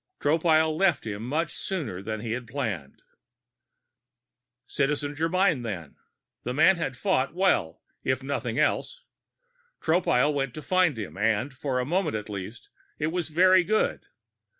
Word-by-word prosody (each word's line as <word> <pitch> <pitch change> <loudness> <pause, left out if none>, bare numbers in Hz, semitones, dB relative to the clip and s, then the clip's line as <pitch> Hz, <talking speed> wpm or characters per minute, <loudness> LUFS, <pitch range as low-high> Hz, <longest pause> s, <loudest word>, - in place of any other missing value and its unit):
Tropile 160 +1 +3
left 180 -4 +2
him 105 -1 -4
much 155 +7 -1
sooner 140 - -4
than 110 +1 -4
he 115 -1 -4
had 120 +1 -4
planned. 110 - -4 1.6
Citizen 145 +2 -1
Germyn, 165 0 +1
then? 90 -10 -6 0.5
The 125 +1 -4
man 180 +5 +5
had 135 -6 -3
fought 160 -6 0
well, 100 - +1 0.2
if 130 0 0
nothing 130 -4 -3
else. - - 0 0.8
Tropile 150 -4 +2
went 135 -3 -2
to 155 - -7
find 185 -7 +2
him 100 -3 -6
and, 115 +6 +1
for 135 0 -2
a 125 - -1
moment 170 - 0
at 105 0 -5
least, 105 +3 -7 0.3
it 155 - -1
was 170 -3 -2
very 185 +3 +5
good. 215 +4 0
140 Hz, 145 wpm, -27 LUFS, 115-165 Hz, 1.6 s, man